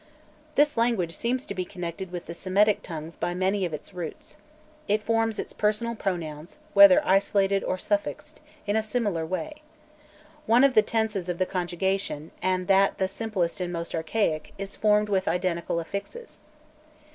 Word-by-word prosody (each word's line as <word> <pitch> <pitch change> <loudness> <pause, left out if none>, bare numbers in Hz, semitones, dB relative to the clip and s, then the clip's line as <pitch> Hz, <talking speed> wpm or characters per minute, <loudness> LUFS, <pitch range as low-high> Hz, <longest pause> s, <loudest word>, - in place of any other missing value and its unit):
This 295 -1 +3
language 225 -8 +1
seems 250 +6 -1
to - - -5
be 185 -1 -2
connected 180 0 -6
with 175 -1 -6
the 170 - -6
Semitic 195 +4 +2
tongues 165 -1 -7
by 175 - -2
many 190 +1 +1
of 175 - -3
its 155 +5 -8
roots. 175 -3 -7 0.5
It 210 +1 +1
forms 225 0 +1
its - - -5
personal 215 +2 0
pronouns, 170 - -4 0.2
whether 300 0 +8
isolated 195 0 +2
or 185 - -1
suffixed, 205 +2 -3 0.3
in 205 0 0
a 220 - +3
similar 210 -7 -1
way. 300 - -4 0.9
One 235 +4 +5
of 275 -2 +5
the 215 - +7
tenses 215 -4 -1
of 175 - -2
the 185 - +1
conjugation, 180 -3 -2
and 185 0 0
that 195 0 +4
the 190 - +1
simplest 190 -4 -2
and 175 -1 -2
most 170 -1 -4
archaic, 160 -1 -1
is 195 0 -6
formed 210 0 +3
with 195 -2 0
identical 175 -2 0
affixes. 200 - -7
195 Hz, 165 wpm, -26 LUFS, 175-215 Hz, 0.9 s, whether